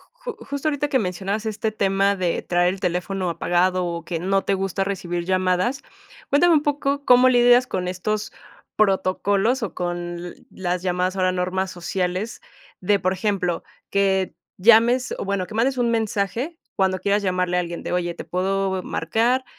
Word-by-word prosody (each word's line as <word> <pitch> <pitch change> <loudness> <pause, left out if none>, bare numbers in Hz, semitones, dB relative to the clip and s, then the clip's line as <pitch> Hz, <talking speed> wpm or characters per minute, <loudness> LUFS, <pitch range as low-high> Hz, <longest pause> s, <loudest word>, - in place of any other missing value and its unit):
Ju - - -7
justo 280 +2 -3
ahorita 295 0 -1
que 270 -2 +2
mencionabas 195 +2 -2
este 215 0 -2
tema 195 -1 +1
de 180 -3 -1
traer 175 +1 +1
el 195 - -11
teléfono 180 +1 -1
apagado 180 +2 +1
o 170 -1 -4
que 170 -1 -3
no 195 +2 +1
te 200 - 0
gusta 195 0 -1
recibir 175 -3 -3
llamadas, 185 +7 +1 0.5
cuéntame 335 +4 +5
un 300 - +3
poco 285 -1 -1
cómo 250 0 +6
lidias 245 0 +5
con 180 -5 -3
estos 210 +4 -2 0.4
protocolos 200 +4 +2
o 205 - -3
con 175 0 -4 0.2
las 180 -1 -3
llamadas 185 +1 0
ahora 185 -1 +2
normas 185 +1 -1
sociales 180 +4 -3 0.4
de, 200 +2 +2
por 185 +1 +1
ejemplo, 185 -3 -1 0.3
que 195 -1 +1 0.2
llames, 235 +5 +5
o - - -3
bueno, 195 -2 -1
que 215 - -11
mandes 255 +4 +1
un 240 -1 +2
mensaje 225 - -1 0.2
cuando 190 -1 +1
quieras 200 +2 +1
llamarle 180 -1 0
a - - +3
alguien 170 -1 -5
de: - - -4
"Oye, 175 -1 -1
¿te - - -8
puedo 190 0 -1
marcar?", 235 +10 0
195 Hz, 170 wpm, -23 LUFS, 180-225 Hz, 0.5 s, cómo